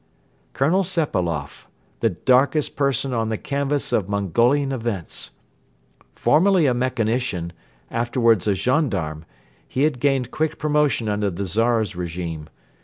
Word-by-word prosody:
Colonel 170 +8 +2
Sepailoff, 90 - -2 0.3
the 115 - +2
darkest 130 - +2
person 135 -2 0
on 115 -2 0
the 110 - -1
canvas 140 +2 -2
of 100 -2 +1
Mongolian 120 - +2
events! 115 -9 -3 0.8
Formerly 180 +2 +3
a 130 - +3
mechanician, 120 -7 -1 0.4
afterwards 115 -3 +2
a 100 - +3
gendarme, 95 - -1 0.4
he 135 - -1
had 150 -4 +1
gained 135 -2 +1
quick 160 0 -1
promotion 150 -6 +1
under 105 -1 0
the 95 +2 -4
Czar's 110 +1 +1
regime. 85 -3 -5
120 Hz, 120 wpm, -22 LUFS, 100-140 Hz, 0.8 s, Formerly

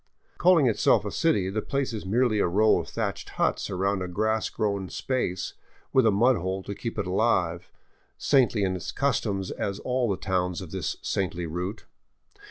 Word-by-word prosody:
Calling 175 -4 +5
itself 115 -4 +3
a - - -3
city, 95 -2 +1
the 110 +2 -1
place 135 -1 -2
is 105 -4 -5
merely 115 +1 +2
a - - +3
row 105 +5 +4
of - - -6
thatched - - -3
huts - - 0
around 95 +1 0
a 90 - -2
grass 110 +4 0
grown 100 -4 -2
space, 110 -9 -2 0.4
with 130 -3 +5
a - - +5
mud 120 +6 +4
hole 95 +2 -3
to 100 - -5
keep 115 +3 -5
it 105 - -1
alive, 90 -3 +1 0.5
saintly 125 -7 +3
in 95 -1 0
its 90 - -5
customs 100 -9 -1
as 100 -1 -3
all 125 +1 -1
the 95 - 0
towns 90 -2 -1
of 90 -4 -8
this 95 -6 -3
saintly 90 -2 -2
route. 90 +6 -4
100 Hz, 180 wpm, -26 LUFS, 95-115 Hz, 0.5 s, Calling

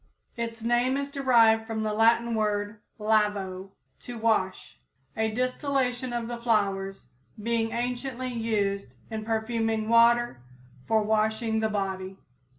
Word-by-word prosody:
Its 230 -1 -5
name 240 +3 +2
is 280 0 -3
derived 230 -5 +4
from 220 -1 -2
the 215 -1 -1
Latin 230 +2 +3
word 210 -1 -1 0.2
Lavo, 205 -3 0 0.3
to 245 -1 -8
wash, 220 -4 -1 0.4
a 220 0 +1
distillation 255 +1 -1
of 235 -1 -3
the 240 0 -5
flowers 195 -4 0 0.3
being 225 +1 0
anciently 250 +1 -3
used 200 - -1 0.2
in 220 -1 -4
perfuming 225 0 -1
water 235 - +4 0.5
for 220 -1 +3
washing 220 +1 +1
the 220 0 +1
body. 190 -2 -3
225 Hz, 125 wpm, -27 LUFS, 210-235 Hz, 0.5 s, derived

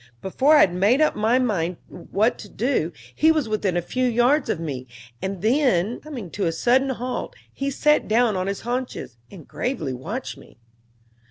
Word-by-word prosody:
Before 265 - +3
I 300 - +7
had 175 - +4
made 200 +9 +3
up 310 - +3
my 220 +4 +2
mind 180 -9 0
what 220 +5 -1
to 205 - -10
do, 220 - -1 0.2
he 315 +1 +4
was 305 -6 0
within 205 -4 0
a 175 - -1
few 255 +7 -1
yards 245 +5 +2
of - - -1
me, 135 -6 -5 0.3
and 190 -1 -4
then, 230 - +2
coming 250 - -8
to 200 - -1
a - - +1
sudden 250 +10 +2
halt, 255 - -4 0.2
he 275 0 -2
sat 300 +2 +2
down 225 -1 +2
on 185 0 -2
his 200 0 -3
haunches, 245 - -4
and 175 -7 -13
gravely 155 - -3
watched 205 - -6
me. - - -17
225 Hz, 185 wpm, -23 LUFS, 185-260 Hz, 0.3 s, I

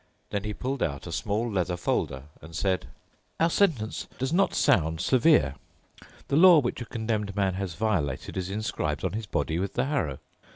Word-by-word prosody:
Then 100 0 -2
he 105 - -2
pulled 130 +3 -3
out 70 -1 -2
a - - -6
small 105 +3 -1
leather 90 -5 -1
folder 65 -6 -1 0.2
and 80 0 -11
said, 95 +1 0 0.5
"Our 165 +1 +3
sentence 145 - +1
does 130 +4 -2
not 195 +3 +2
sound 80 -2 +2
severe. 130 - +4 0.7
The - - 0
law 175 +2 +8
which 125 -3 0
a - - -4
condemned 110 -3 -2
man 95 -2 +1
has 95 -3 -4
violated 85 -10 -1
is 95 -1 -3
inscribed 110 +2 -2
on - - -1
his 110 0 -4
body 80 -3 -1
with 95 +1 -3
the 125 - +1
harrow. 130 - -1
105 Hz, 180 wpm, -27 LUFS, 90-125 Hz, 0.7 s, law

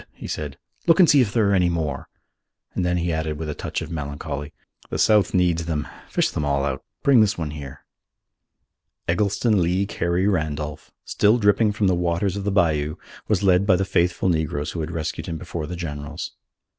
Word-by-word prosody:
he - - -10
said. 75 -3 -4 0.3
"Look 165 +2 +5
and 180 - +8
see 145 -4 +6
if 110 -5 +1
there 110 -2 +2
are - - +2
many 90 -3 +3
more," 80 -6 -3 0.6
and 90 - -1
then 90 0 +1
he 85 -1 0
added 80 -1 -2
with 80 0 -4
a - - -2
touch - - -4
of 80 - -8
melancholy, 75 -1 -5 0.4
"The - - -3
South 105 -4 +4
needs 85 -2 +2
them: 75 -2 -2 0.2
fish - - +1
them 75 - -2
all 70 -1 +1
out. 65 -2 -3 0.2
Bring 135 -5 +6
this 105 -1 +2
one 80 -3 -3
here." 70 -2 -9 1.2
Eggleston 105 +3 +2
Lee 90 +3 +1
Carey 90 -1 0
Randolph, 75 -3 -2 0.2
still 105 +3 +3
dripping 105 0 +3
from 105 -1 0
the 95 - +4
waters 90 +2 0
of 100 -1 -4
the 100 - +1
bayou, 80 -5 +1 0.3
was 100 -2 +1
led 95 0 +4
by 95 - +6
the 95 +2 0
faithful 90 0 +1
negroes 80 -3 0
who 85 - -5
had 80 0 -3
rescued 80 0 -4
him 85 -2 -3
before 85 -2 -5
the 90 - -5
generals. 75 -1 -5
85 Hz, 200 wpm, -23 LUFS, 75-100 Hz, 1.2 s, and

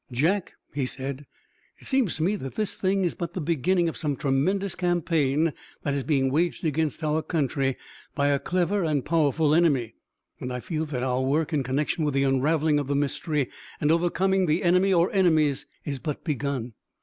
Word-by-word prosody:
"Jack," 170 +10 0 0.2
he 140 -3 -1
said, 135 +2 -5 0.5
"it - - -17
seems 265 - +1
to 160 - -2
me 195 +5 +2
that 135 -9 -6
this 215 -2 -1
thing 195 0 +1
is 175 - 0
but 170 0 -5
the - - -2
beginning 170 +3 +1
of 165 - -3
some 145 -3 -2
tremendous 175 +9 0
campaign 165 -4 +1 0.3
that 145 - 0
is 140 -1 -1
being 135 -3 +1
waged 170 +4 0
against 160 0 -1
our 155 +1 +1
country 140 -4 -1 0.4
by 140 0 +2
a 140 -1 +2
clever 185 +4 0
and 150 -5 0
powerful 155 -1 +2
enemy. 140 -9 +2 0.5
And 125 - -4
I 125 - -3
feel 160 +4 -3
that 130 -5 -3
our 130 0 0
work 150 +5 0
in 145 - +2
connection 145 +6 -1
with 145 -2 0
the 135 - +3
unraveling 145 +3 +2
of 145 - -3
the 140 - 0
mystery 145 0 -1 0.3
and 150 - +2
overcoming 185 +3 +2
the 155 +3 +1
enemy 180 +2 +4
or 175 -1 +3
enemies 155 -7 +2 0.2
is 140 -2 -3
but 150 -1 -4
begun. 140 -6 -2
155 Hz, 190 wpm, -26 LUFS, 140-175 Hz, 0.5 s, enemy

